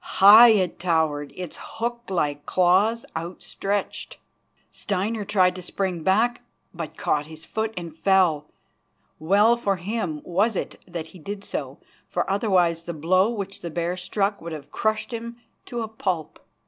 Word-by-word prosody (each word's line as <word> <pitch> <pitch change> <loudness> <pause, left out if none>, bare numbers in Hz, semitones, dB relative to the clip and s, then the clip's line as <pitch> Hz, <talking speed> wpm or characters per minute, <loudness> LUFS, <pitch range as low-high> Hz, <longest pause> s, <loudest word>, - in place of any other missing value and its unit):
High 215 +5 +10
it 190 -6 +2
towered, 160 -5 0
its 180 -3 -7
hook 235 +1 -4
like 145 -6 -1
claws 190 +6 +3
outstretched. 195 +4 -4 0.5
Steinar 205 +2 -2
tried 185 -3 +3
to - - -6
spring 180 -1 -3
back, 225 +8 +2 0.3
but 165 -3 -7
caught 150 0 0
his 160 0 -9
foot, 220 0 -2
and 170 -3 -6
fell. 170 -5 +3 0.7
Well 205 +8 +4
for 205 -5 0
him 185 -4 -3
was 200 +5 +1
it - - -4
that 170 -3 -5
he 185 - -12
did 200 +5 -6
so, - - -5 0.3
for - - -1
otherwise 180 -5 +2
the 170 - -4
blow 185 +6 +3
which 200 -4 -5
the 170 - -5
bear 170 +2 -2
struck 200 +3 -1
would 170 0 -6
have 145 -2 -9
crushed 215 +3 -1
him 235 +1 -6 0.3
to 240 -1 -3
a - - -4
pulp. 185 -7 -3
185 Hz, 155 wpm, -24 LUFS, 170-215 Hz, 0.7 s, High